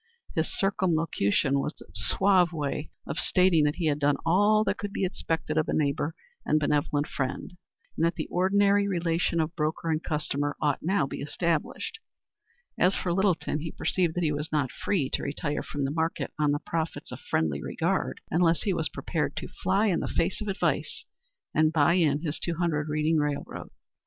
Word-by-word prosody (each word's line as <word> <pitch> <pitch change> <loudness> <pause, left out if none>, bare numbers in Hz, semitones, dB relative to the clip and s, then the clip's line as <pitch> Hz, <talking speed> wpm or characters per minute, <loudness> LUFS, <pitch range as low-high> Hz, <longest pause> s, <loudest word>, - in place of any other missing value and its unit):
His 160 0 0
circumlocution 160 - +1
was 150 - -4
a - - -14
suave 180 - +3
way 150 -1 -3 0.2
of - - -3
stating 180 -4 +4
that 150 - +1
he 175 - -2
had 150 -1 +1
done 145 -1 +2
all 205 +5 +4
that - - -1
could 205 -1 -4
be 195 - -1
expected 160 -3 -1
of 155 - 0
a - - 0
neighbor 145 +1 0 0.3
and 155 - +2
benevolent 145 0 +1
friend, 150 +5 -4 0.4
and - - -1
that 170 0 +2
the - - -3
ordinary 200 +2 +3
relation 170 -2 0
of 160 +1 -1
broker 160 +1 -1
and 155 0 0
customer 145 -2 -1
ought 145 -2 +1
now 180 -2 +1
be 135 - -6
established. 165 - -2 0.8
As 185 +2 +4
for 175 - -1
Littleton, 175 -6 +1
he 160 +1 -5
perceived 175 -4 0
that 175 - 0
he 155 - +2
was 150 +1 -3
not 145 -5 0
free 165 -10 -1
to - - 0
retire 145 0 -2
from 145 - -4
the 135 - -1
market 160 +2 -2
on 150 -1 +3
the 145 - +1
profits 165 +2 -4
of - - -7
friendly 75 -3 -1
regard - - -1
unless 165 0 +3
he 200 - +1
was 160 -2 -1
prepared 160 -4 -2
to - - -4
fly 195 +4 0
in 185 -6 +2
the - - -2
face 175 +5 -1
of 210 - -4
advice 195 -1 -1 0.5
and 155 0 +3
buy 160 0 +4
in 155 -5 +2
his 155 -2 -2
two 170 - -2
hundred 155 -3 0
Reading 155 +2 +1
railroad. 145 -1 -3
160 Hz, 190 wpm, -27 LUFS, 150-180 Hz, 0.8 s, stating